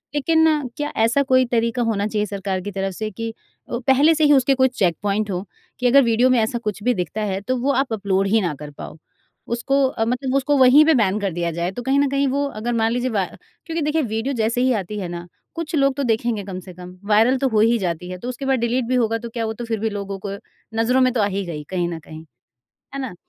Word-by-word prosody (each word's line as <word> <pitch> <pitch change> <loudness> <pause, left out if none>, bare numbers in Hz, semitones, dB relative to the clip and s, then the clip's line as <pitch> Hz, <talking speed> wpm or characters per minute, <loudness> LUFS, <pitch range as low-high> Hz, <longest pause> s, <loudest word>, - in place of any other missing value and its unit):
लेकिन 310 -1 +2
क्या 295 0 -2 0.2
ऐसा 240 +5 +2
कोई 255 -1 +3
तरीका 235 +1 +1
होना 210 -3 0
चाहिए 210 -1 -1
सरकार 195 -2 -3
की 205 +2 -6
तरफ 195 0 -3
से 215 +3 -4
कि 230 +4 -5 0.4
अ, 235 - -2
पहले 280 +5 +5
से 310 - +1
ही 295 -1 +6
उसके 270 0 +4
कोई 260 0 +4
चेकपॉइंट 205 -1 -1
हों 180 0 -3 0.4
कि 250 - +2
अगर 275 +3 +6
वीडियो 235 +2 +3
में 255 -2 +4
ऐसा 220 +2 0
कुछ 210 -3 -4
भी 250 - +3
दिखता 185 +1 -3
है, 195 -2 -2
तो 255 +5 -1
वो 265 +3 +1
आप 270 -3 0
अपलोड 195 -2 0
ही 220 +2 +3
ना 175 -5 -1
कर 150 -1 -8
पाओ। 145 - -10 0.5
उसको 275 +4 +1
अ, 225 -3 -2
मतलब 255 +3 -1
उसको 285 +1 +2
वहीं 270 +4 +7
पे 320 - +5
बैन 210 -6 +2
कर 200 -3 -1
दिया 170 0 -2
जाए 170 +2 -2
तो 245 - -6
कहीं 270 +2 +2
न 285 - +2
कहीं 275 +1 +1
वो 280 +2 0 0.2
अगर 240 +2 -1
मान 225 -1 +1
लीजिए 245 +2 -1
वा 200 -5 0 0.4
क्योंकि 330 -1 -3
देखिए 300 +2 +1
वीडियो 230 +2 -2
जैसे 235 +3 0
ही 260 +1 +3
आती 210 +3 -6
है 185 - -4
ना 175 0 -7 0.3
कुछ 330 -1 -4
लोग 275 -2 +3
तो 280 - -2
देखेंगे 225 -3 0
कम 190 -2 -6
से 185 0 -11
कम, 180 0 -10 0.2
वायरल 225 +5 +4
तो 270 +1 +1
हो 220 -3 +1
ही 230 +2 +4
जाती 180 -2 -3
है 185 - -5
तो 240 +7 -6
उसके 255 +2 -5
बाद 265 -1 +1
डिलीट 235 +2 0
भी 255 - +1
होगा 225 -2 +1
तो 235 - -7
क्या 230 0 -3
वो 220 - -3
तो 240 +2 -7
फिर 225 -2 -2
भी 220 +1 -1
लोगों 200 -1 -5
को 200 0 -3 0.4
नज़रों 250 +3 +3
में 255 0 +4
तो 230 - +1
आ - - +3
ही 200 0 -2
गई 155 -4 -6
कहीं 180 -2 -1
न 165 -1 -5
कहीं 155 0 -11 0.7
है 275 - -3
ना, 260 -8 -5
230 Hz, 265 wpm, -21 LUFS, 200-260 Hz, 0.7 s, वहीं